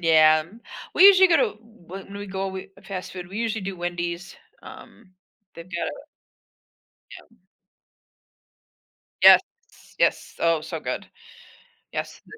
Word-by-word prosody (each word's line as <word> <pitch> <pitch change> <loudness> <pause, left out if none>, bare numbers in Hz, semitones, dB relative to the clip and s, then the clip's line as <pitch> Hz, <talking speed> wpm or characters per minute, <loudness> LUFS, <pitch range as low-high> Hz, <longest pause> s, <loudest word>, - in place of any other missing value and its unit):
Yeah, 155 -2 +5 0.5
we - - +5
usually 380 -1 +8
go 335 - +5
to - - +3
w 195 -4 -12
when 200 0 -10
we 205 - -7
go 195 0 -4
we 190 0 -8
fast 190 -2 -7
food, 180 -1 -8
we 195 +3 -7
usually 225 -1 -2
do 190 0 -5
Wendy's. 175 +1 -5 0.3
Um, 215 -5 -14 0.4
they've 170 - -10
got 170 -2 -3 1.2
Yeah. 230 - -15 1.9
Yes, - - +9 0.6
yes. - - 0
Oh, 165 -2 +2
so 155 - -6
good. - - -5 0.9
Yes, - - -6
the 430 - -14
190 Hz, 130 wpm, -24 LUFS, 170-215 Hz, 1.9 s, Yes